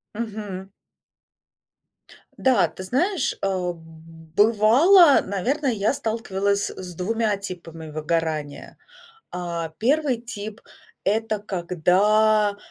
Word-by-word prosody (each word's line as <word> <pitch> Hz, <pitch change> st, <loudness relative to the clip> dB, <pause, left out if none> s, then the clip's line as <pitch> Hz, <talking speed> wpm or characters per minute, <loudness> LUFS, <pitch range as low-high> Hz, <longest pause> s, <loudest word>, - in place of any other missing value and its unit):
Мгм. 205 Hz, -4 st, -6 dB, 1.7 s
Да, 240 Hz, -10 st, +3 dB
ты 185 Hz, -, -9 dB
знаешь, 285 Hz, -, 0 dB
э, -, -, 0 dB, 0.3 s
б 165 Hz, -, -16 dB, 0.6 s
бывало, 255 Hz, -, +6 dB
наверное, 250 Hz, +8 st, -1 dB
я 210 Hz, +4 st, 0 dB
сталкивалась 200 Hz, -4 st, -1 dB
с 180 Hz, -2 st, -9 dB
2 215 Hz, +3 st, 0 dB
типами 165 Hz, -5 st, -8 dB
выгорания. 155 Hz, -1 st, -3 dB, 0.5 s
А, 170 Hz, -2 st, -4 dB
первый 270 Hz, -, +1 dB
тип, 220 Hz, -2 st, -8 dB, 0.5 s
это 215 Hz, +1 st, 0 dB
когда 205 Hz, +3 st, +2 dB
205 Hz, 90 wpm, -23 LUFS, 180-230 Hz, 1.7 s, бывало